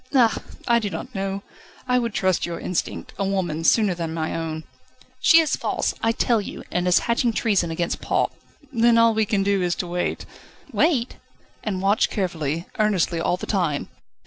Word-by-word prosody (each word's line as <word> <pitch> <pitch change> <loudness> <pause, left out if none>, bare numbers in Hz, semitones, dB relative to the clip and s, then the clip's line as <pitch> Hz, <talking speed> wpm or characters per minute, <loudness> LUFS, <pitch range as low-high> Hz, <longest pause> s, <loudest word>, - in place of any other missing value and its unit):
"Ah! 230 -5 +4 0.3
I 235 0 +4
do 210 -3 -2
not 255 +6 -6
know. 195 0 -3 0.4
I 250 0 +3
would 235 -3 -3
trust 185 -2 +1
your 170 -1 -3
instinct 180 - -3
a - - +1
woman's 175 -5 +1
sooner 210 -5 +2
than 165 -2 -4
my 160 -1 -2
own." 160 -1 -4 0.6
"She 330 - +7
is 315 - 0
false, - - -1
I 225 - +3
tell 230 -1 +1
you, - - -7
and 180 0 0
is 180 - +5
hatching 235 0 +1
treason 200 -6 +1
against 170 +1 -2
Paul." - - +1 0.4
"Then 235 0 +4
all 230 0 +5
we 220 -1 +1
can 195 -2 +1
do 200 -1 +1
is 175 -1 +1
to - - -3
wait." 175 0 -2 0.5
"Wait?" 265 -7 +1 0.5
"And 190 -3 -2
watch 200 +3 +3
carefully, 170 -5 -2
earnestly, 190 -5 +2
all 175 +2 +1
the - - -6
time. 170 -8 -1
195 Hz, 185 wpm, -23 LUFS, 175-225 Hz, 0.6 s, She